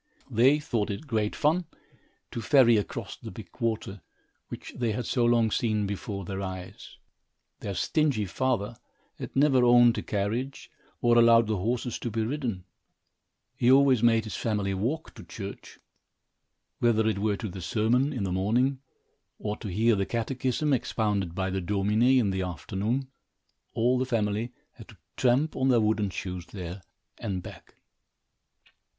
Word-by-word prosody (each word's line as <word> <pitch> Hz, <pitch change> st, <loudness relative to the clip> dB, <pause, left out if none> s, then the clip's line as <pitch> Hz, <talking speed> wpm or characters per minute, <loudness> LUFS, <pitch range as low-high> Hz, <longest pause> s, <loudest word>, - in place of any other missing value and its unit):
They 130 Hz, +6 st, +5 dB
thought 120 Hz, -8 st, -2 dB
it 100 Hz, +9 st, -5 dB
great 110 Hz, -6 st, -1 dB
fun 165 Hz, +4 st, +1 dB, 0.7 s
to 115 Hz, -, -4 dB
ferry 125 Hz, -3 st, +5 dB
across 105 Hz, -, -3 dB
the -, -, -9 dB
big -, -, -10 dB
water, 110 Hz, -4 st, -2 dB, 0.5 s
which -, -, -8 dB
they 120 Hz, -3 st, -1 dB
had 120 Hz, +3 st, -3 dB
so 125 Hz, -, 0 dB
long 120 Hz, -2 st, +3 dB
seen 110 Hz, -3 st, 0 dB
before 100 Hz, -1 st, -4 dB
their 95 Hz, +1 st, -4 dB
eyes. 95 Hz, -1 st, -7 dB, 0.6 s
Their 100 Hz, -2 st, -5 dB
stingy 145 Hz, -, +1 dB
father 115 Hz, 0 st, -1 dB, 0.4 s
had -, -, -7 dB
never 135 Hz, -2 st, +4 dB
owned 120 Hz, -1 st, +6 dB
a -, -, -3 dB
carriage, 110 Hz, +7 st, -3 dB, 0.3 s
or 120 Hz, 0 st, +5 dB
allowed 115 Hz, 0 st, +6 dB
the 110 Hz, -1 st, -1 dB
horses 120 Hz, +5 st, -2 dB
to 120 Hz, -, -3 dB
be 110 Hz, 0 st, -1 dB
ridden. 120 Hz, -8 st, -3 dB, 0.9 s
He 120 Hz, -, +2 dB
always 135 Hz, -3 st, +5 dB
made 115 Hz, -1 st, +4 dB
his 110 Hz, -, -6 dB
family 105 Hz, -3 st, -1 dB
walk 125 Hz, +12 st, -3 dB
to -, -, -11 dB
church. 100 Hz, -2 st, -9 dB, 1.0 s
Whether 110 Hz, -2 st, +3 dB
it 105 Hz, -3 st, 0 dB
were 105 Hz, -1 st, 0 dB
to 110 Hz, -, -4 dB
the 95 Hz, -1 st, -7 dB
sermon, 115 Hz, -, +1 dB
in 125 Hz, -8 st, -3 dB
the 95 Hz, -, -2 dB
morning, 120 Hz, +9 st, +1 dB, 0.6 s
or 105 Hz, 0 st, -3 dB
to -, -, -7 dB
hear 110 Hz, +4 st, +2 dB
the 100 Hz, -1 st, -1 dB
catechism 130 Hz, +4 st, -1 dB
expounded 105 Hz, -7 st, -1 dB
by 95 Hz, 0 st, -1 dB
the 95 Hz, 0 st, -2 dB
Domine, 105 Hz, +4 st, 0 dB, 0.2 s
in 110 Hz, -6 st, +2 dB
the 95 Hz, 0 st, -1 dB
afternoon, 95 Hz, -, -2 dB, 0.7 s
all 120 Hz, +2 st, +2 dB
the 130 Hz, -, 0 dB
family 110 Hz, -1 st, -1 dB, 0.2 s
had -, -, -14 dB
to -, -, -16 dB, 0.2 s
tramp 130 Hz, +5 st, +2 dB
on 130 Hz, 0 st, +1 dB
their 120 Hz, -2 st, +5 dB
wooden 105 Hz, -2 st, +1 dB
shoes 90 Hz, -2 st, -6 dB
there 90 Hz, -1 st, -7 dB, 0.4 s
and 95 Hz, -3 st, -3 dB
back. -, -, -12 dB
110 Hz, 160 wpm, -27 LUFS, 100-125 Hz, 1.0 s, owned